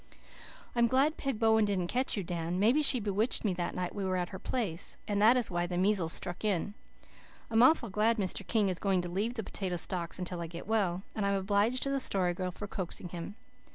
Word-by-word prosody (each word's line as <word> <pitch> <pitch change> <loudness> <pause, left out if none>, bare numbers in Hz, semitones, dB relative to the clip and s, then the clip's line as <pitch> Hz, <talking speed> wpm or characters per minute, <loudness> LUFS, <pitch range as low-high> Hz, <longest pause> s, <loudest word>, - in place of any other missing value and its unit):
"I'm 235 0 +4
glad 275 +6 +2
Peg 270 -5 -2
Bowen 220 0 +4
didn't 195 -3 0
catch 250 +6 -1
you, 200 - -1
Dan. 170 +1 -3
Maybe 235 +9 +4
she 275 -3 +5
bewitched 210 +3 +2
me 200 - +2
that 175 -1 -3
night 180 -1 -3
we 200 - -4
were 185 -1 -1
at 175 -1 -2
her 190 - -8
place, 200 -10 -2
and 205 -1 0
that 230 +4 +6
is 240 -5 -1
why 175 0 -1
the 175 0 -3
measles 185 -3 +2
struck 175 +3 -2
in. 205 -1 0 0.8
I'm 225 0 +4
awful 245 -5 +4
glad 220 +4 +2
Mr. 195 -1 -1
King 215 -4 +2
is 185 -2 -1
going 190 -3 +1
to 175 - -5
leave 210 +7 -2
the 225 - -3
potato 190 -2 -3
stalks 175 0 -1
until 180 -1 -4
I 170 - -4
get 170 +1 -8
well, 195 -4 0
and 215 - -2
I'm 200 0 +1
obliged 205 +6 +1
to 275 - 0
the 275 - 0
Story 185 -8 +1
Girl 185 +1 -3
for 195 +3 -7
coaxing 185 -2 -5
him. 175 +3 -7
200 Hz, 230 wpm, -31 LUFS, 180-225 Hz, 0.8 s, that